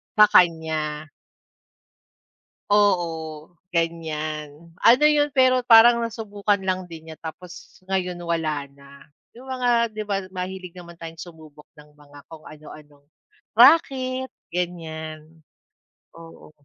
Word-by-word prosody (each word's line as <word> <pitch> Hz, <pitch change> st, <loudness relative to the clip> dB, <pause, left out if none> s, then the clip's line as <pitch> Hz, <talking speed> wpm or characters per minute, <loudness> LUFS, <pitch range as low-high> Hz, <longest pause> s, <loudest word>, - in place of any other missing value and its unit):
Sa 210 Hz, 0 st, +8 dB
kanya? 155 Hz, -3 st, +1 dB, 1.6 s
Oo 170 Hz, -6 st, 0 dB, 0.2 s
ganyan. 160 Hz, -1 st, -4 dB
Ano 250 Hz, +6 st, +6 dB
yun, 295 Hz, -1 st, +3 dB
pero 255 Hz, -2 st, +3 dB
parang 235 Hz, 0 st, +7 dB
nasubukan 210 Hz, -3 st, -2 dB
lang 185 Hz, -1 st, -3 dB
din 160 Hz, -1 st, -11 dB
niya 160 Hz, -1 st, -10 dB
tapos 170 Hz, +2 st, -11 dB
ngayon 180 Hz, -2 st, -2 dB
wala 155 Hz, -4 st, -2 dB
na, 140 Hz, 0 st, -17 dB, 0.3 s
'yong 260 Hz, -, -13 dB
mga 255 Hz, -1 st, -1 dB, 0.2 s
'di 215 Hz, 0 st, -4 dB
ba 195 Hz, -1 st, -2 dB
mahilig 185 Hz, -1 st, -6 dB
naman 170 Hz, -1 st, -12 dB
tayong 165 Hz, -1 st, -9 dB
sumubok 155 Hz, -3 st, -14 dB
ng 150 Hz, 0 st, -17 dB
mga 145 Hz, -1 st, -17 dB
kung 160 Hz, -1 st, -13 dB
ano-anong 150 Hz, -1 st, -15 dB, 0.5 s
raket 260 Hz, -1 st, +4 dB, 0.2 s
ganyan, 160 Hz, -3 st, -5 dB, 0.9 s
oo. 165 Hz, -2 st, -14 dB
170 Hz, 110 wpm, -23 LUFS, 155-205 Hz, 1.6 s, Sa